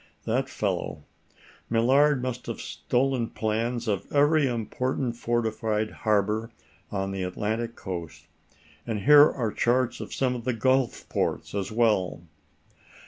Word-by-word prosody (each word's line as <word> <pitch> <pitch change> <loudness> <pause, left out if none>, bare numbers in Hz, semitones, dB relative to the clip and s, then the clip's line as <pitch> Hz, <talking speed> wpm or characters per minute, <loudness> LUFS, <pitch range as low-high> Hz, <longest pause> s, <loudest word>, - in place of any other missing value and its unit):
That - - 0
fellow. - - -3 0.7
Millard 130 +4 +3
must 125 -1 -4
have - - -4
stolen 125 -2 -1
plans 115 +2 -2
of 100 -3 -2
every 145 0 +4
important 125 +1 -2
fortified 110 -2 -1
harbor 110 +1 0 0.4
on 95 -1 -2
the 95 -1 -3
Atlantic 110 +5 -2
coast. 85 -5 -7 0.6
And 110 -3 -2
here 150 +4 +8
are 115 -5 -2
charts 120 +2 +1
of - - -7
some 130 -2 0
of 120 -2 -5
the 130 +1 0
gulf 130 +2 +1
ports - - -2
as 100 0 -2
well." 105 -7 +1
115 Hz, 130 wpm, -26 LUFS, 105-130 Hz, 0.7 s, here